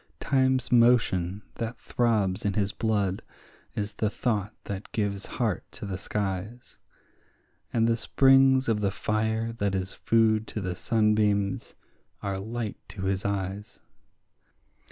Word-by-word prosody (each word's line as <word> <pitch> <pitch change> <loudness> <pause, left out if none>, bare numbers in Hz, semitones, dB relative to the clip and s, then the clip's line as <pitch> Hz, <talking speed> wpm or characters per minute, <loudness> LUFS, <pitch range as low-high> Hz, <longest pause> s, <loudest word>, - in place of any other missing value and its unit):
Time's 130 -2 +2
motion 110 -6 +3
that 115 +1 -3
throbs 110 -4 0
in 100 -2 0
his 100 -2 +1
blood 105 -5 0 0.5
is 105 0 -3
the 105 - 0
thought 105 -2 -1
that 100 0 -6
gives 100 -2 -2
heart 110 -7 0
to - - -7
the 100 -2 -3
skies, 105 +4 -4 0.9
And 115 -1 +2
the 115 - +3
springs 135 +2 +4
of 110 -2 +1
the 100 - +2
fire 110 +3 -1
that 100 -4 -1
is 95 0 -2
food 110 -1 +2
to - - -4
the 95 -3 -2
sunbeams 105 -2 +1 0.5
are 100 -1 -2
light 110 +1 -4
to 95 - -7
his 95 0 -1
eyes. 100 +1 -3
105 Hz, 135 wpm, -27 LUFS, 100-115 Hz, 0.9 s, springs